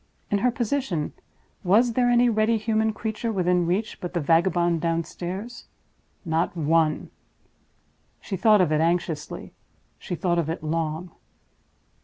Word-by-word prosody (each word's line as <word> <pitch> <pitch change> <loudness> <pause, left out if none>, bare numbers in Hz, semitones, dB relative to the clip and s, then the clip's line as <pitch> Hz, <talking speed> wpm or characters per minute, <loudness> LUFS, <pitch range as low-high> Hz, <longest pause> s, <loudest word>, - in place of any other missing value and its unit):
In 205 - +2
her 250 - +3
position, 240 - -2 0.5
was 225 +6 +4
there 245 +1 +2
any 245 0 +4
ready 225 0 +2
human 220 0 +1
creature 220 +1 -3
within 180 -3 +1
reach 205 +6 -2
but 180 0 -6
the - - +2
vagabond 170 +1 +2
downstairs? 175 +7 -4 0.6
Not 165 +2 -1
one. 160 0 +1 1.1
She 195 - -5
thought 210 +2 +5
of 170 -4 +2
it 155 0 +2
anxiously, 165 -2 -2 0.5
she 175 - -5
thought 175 0 0
of 160 -2 -1
it 165 -1 -4
long. 160 +2 -2
180 Hz, 135 wpm, -25 LUFS, 165-220 Hz, 1.1 s, thought